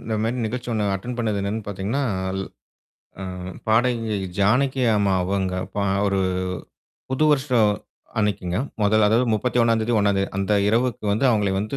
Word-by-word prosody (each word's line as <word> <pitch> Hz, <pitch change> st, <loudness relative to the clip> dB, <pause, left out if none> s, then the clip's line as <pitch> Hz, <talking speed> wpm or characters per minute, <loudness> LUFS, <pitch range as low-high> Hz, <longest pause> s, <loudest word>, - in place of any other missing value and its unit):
இந்த 110 Hz, -1 st, -3 dB
மாரி 115 Hz, +3 st, -1 dB
நிகழ்ச்சி 120 Hz, +2 st, -5 dB
ஒண்ணு 110 Hz, -2 st, 0 dB
அட்டெண்ட் 120 Hz, +6 st, -5 dB
பண்ணது 110 Hz, -3 st, 0 dB
என்னான்னு 105 Hz, +2 st, -3 dB
பார்த்தீங்கன்னா, 100 Hz, +8 st, -2 dB, 0.3 s
அல் 95 Hz, 0 st, -2 dB, 0.8 s
அ, -, -, -4 dB, 0.4 s
பாடகி 115 Hz, -1 st, +2 dB, 0.2 s
ஜானகி 130 Hz, +6 st, +2 dB
அம்மா 100 Hz, -1 st, +2 dB
அவங்க, 95 Hz, 0 st, -1 dB, 0.2 s
பா 100 Hz, -, 0 dB, 0.2 s
ஒரு 100 Hz, -1 st, +1 dB, 0.9 s
புது 130 Hz, +4 st, +1 dB
வருஷ 145 Hz, 0 st, 0 dB, 0.7 s
அன்னைக்குங்க. 100 Hz, -4 st, 0 dB, 0.2 s
மொதல் 105 Hz, +1 st, +4 dB
அதாவது 115 Hz, +4 st, +3 dB
31ம் 115 Hz, 0 st, +2 dB
தேதி 115 Hz, +2 st, 0 dB
1ம் 100 Hz, -1 st, +2 dB
தேதி 95 Hz, -, 0 dB
அந்த 100 Hz, +2 st, 0 dB, 0.2 s
இரவுக்கு 115 Hz, 0 st, 0 dB
வந்து, 110 Hz, +7 st, 0 dB
அவங்கள 105 Hz, -4 st, +1 dB
வந்து 105 Hz, +7 st, -3 dB
110 Hz, 155 wpm, -23 LUFS, 100-120 Hz, 0.9 s, மொதல்